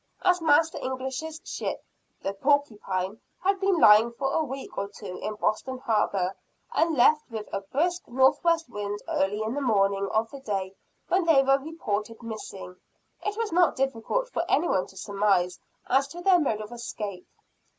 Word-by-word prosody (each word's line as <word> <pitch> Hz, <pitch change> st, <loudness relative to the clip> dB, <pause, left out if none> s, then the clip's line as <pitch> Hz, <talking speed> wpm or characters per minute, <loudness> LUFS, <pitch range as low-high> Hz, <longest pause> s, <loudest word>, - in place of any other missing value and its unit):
As 360 Hz, -1 st, +3 dB
Master 320 Hz, +1 st, +3 dB
English's 265 Hz, +5 st, -4 dB
ship, -, -, -4 dB, 0.4 s
"The 195 Hz, -, -1 dB
Porcupine," 210 Hz, -6 st, 0 dB, 0.2 s
had 390 Hz, +1 st, +2 dB
been 390 Hz, -2 st, +2 dB
lying 220 Hz, -3 st, +7 dB
for 270 Hz, +3 st, -2 dB
a 320 Hz, -, +2 dB
week 270 Hz, -1 st, -7 dB
or 200 Hz, -, -2 dB
two 200 Hz, -2 st, -8 dB
in 215 Hz, -, -3 dB
Boston 255 Hz, +5 st, -1 dB
harbor, 210 Hz, -7 st, 0 dB, 0.4 s
and 325 Hz, -3 st, +2 dB
left 300 Hz, +5 st, +4 dB
with 220 Hz, -2 st, -6 dB
a 195 Hz, -, -1 dB
brisk 340 Hz, -, -1 dB
northwest 320 Hz, +7 st, +3 dB
wind 205 Hz, -3 st, -4 dB
early 205 Hz, +3 st, 0 dB
in 220 Hz, +2 st, -2 dB
the 290 Hz, -, -2 dB
morning 200 Hz, -5 st, +2 dB
of 220 Hz, +1 st, 0 dB
the 275 Hz, -, -8 dB
day 195 Hz, -7 st, -3 dB, 0.3 s
when 370 Hz, -1 st, +2 dB
they 300 Hz, -5 st, +5 dB
were 270 Hz, +1 st, +4 dB
reported 230 Hz, -7 st, -4 dB
missing, 200 Hz, -5 st, -7 dB, 0.5 s
it 415 Hz, 0 st, -2 dB
was 455 Hz, -3 st, -1 dB
not 350 Hz, +1 st, +4 dB
difficult 270 Hz, -, -1 dB
for -, -, -2 dB
anyone 295 Hz, -, +2 dB
to 190 Hz, -, -16 dB
surmise 195 Hz, -3 st, +1 dB, 0.3 s
as 270 Hz, +1 st, +3 dB
to 345 Hz, +4 st, -9 dB
their 365 Hz, -1 st, +5 dB
mode 225 Hz, -9 st, 0 dB
of 215 Hz, +2 st, -8 dB
escape. 210 Hz, -6 st, -6 dB
245 Hz, 170 wpm, -27 LUFS, 205-315 Hz, 0.5 s, lying